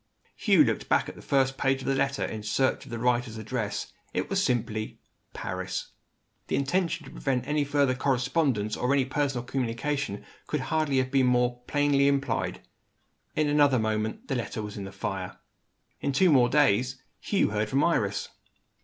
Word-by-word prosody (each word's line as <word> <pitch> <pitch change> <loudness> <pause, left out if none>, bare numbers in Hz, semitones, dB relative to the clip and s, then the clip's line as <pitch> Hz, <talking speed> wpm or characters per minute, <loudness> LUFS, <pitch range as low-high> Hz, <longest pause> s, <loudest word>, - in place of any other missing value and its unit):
Hugh - - +5
looked - - -1
back - - +3
at - - -9
the - - -12
first 135 -1 +1
page 135 0 +1
of - - -6
the 135 - +2
letter, 135 0 0
in 110 - -5
search 130 +5 0
of - - -13
the 120 - -4
writer's 120 -1 0
address. 110 -1 -3 0.2
It - - -2
was - - +2
simply, 110 -3 -1 0.4
"Paris." - - -4 0.6
The - - 0
intention 170 +4 0
to - - -11
prevent 130 -2 -2
any 150 0 +1
further 140 -2 +2
correspondence, 125 -4 0
or 125 - 0
any 135 -2 +3
personal 135 -2 -1
communication, 125 -1 -2 0.2
could 150 - -1
hardly 155 -1 0
have 130 0 +1
been 135 -2 +3
more 125 0 +2
plainly 145 -1 +3
implied. 140 -1 0 0.7
In 155 -1 +2
another 145 -2 +4
moment, 110 -1 -2
the - - -2
letter 115 -3 -3
was 105 -1 -6
in 100 - -5
the 100 - -8
fire. 95 -1 -4 0.6
In 140 - -1
two 135 -6 +5
days 130 -3 +3
more, 130 - -29 0.2
Hugh 200 - +1
heard 105 0 -1
from 135 +5 +2
Iris. 100 -12 0
130 Hz, 175 wpm, -27 LUFS, 115-140 Hz, 0.7 s, Hugh